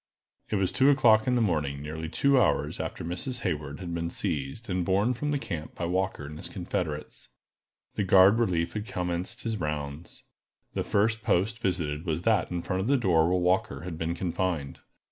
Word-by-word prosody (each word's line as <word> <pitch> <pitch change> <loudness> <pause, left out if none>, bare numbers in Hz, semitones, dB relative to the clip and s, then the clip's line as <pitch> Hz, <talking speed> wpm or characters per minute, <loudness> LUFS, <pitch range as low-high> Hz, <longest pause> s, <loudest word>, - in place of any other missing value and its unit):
_ - - -19
IT - - +1
was 95 -2 +1
two 135 +1 +4
o'clock 110 -6 +5
in 125 - +3
the 120 - +2
morning, 75 -8 0
nearly 80 +2 -5
two 135 +10 +3
hours - - +1
after - - -4
Miss 120 +9 -2
Hayward 75 -5 -3
had 85 -3 -5
been 85 0 -2
seized, 70 - -3
and 90 -2 0
borne 100 +7 +2
from 145 +5 -3
the 145 - +1
camp 80 - -6
by 85 - -3
Walker 90 -3 -1
and 75 +1 -8
his - - -5
confederates. 85 -5 -4 0.6
The 105 - -1
guard 95 +3 +6
relief 85 -7 +1
had 105 0 -4
commenced 90 +2 -3
his 115 -2 -2
rounds. 75 0 -5 0.5
The - - -1
first 110 +2 +1
post 105 +4 +1
visited 85 -5 -2
was 80 +1 -1
that 110 -6 +2
in 85 -1 -3
front 95 -1 -1
of 100 - -2
the 140 +1 +4
door 85 -9 +3
where 90 - +2
Walker 90 -6 +1
had 85 -1 -6
been 80 +1 -1
confined. 85 -5 -2
90 Hz, 200 wpm, -28 LUFS, 80-110 Hz, 0.6 s, guard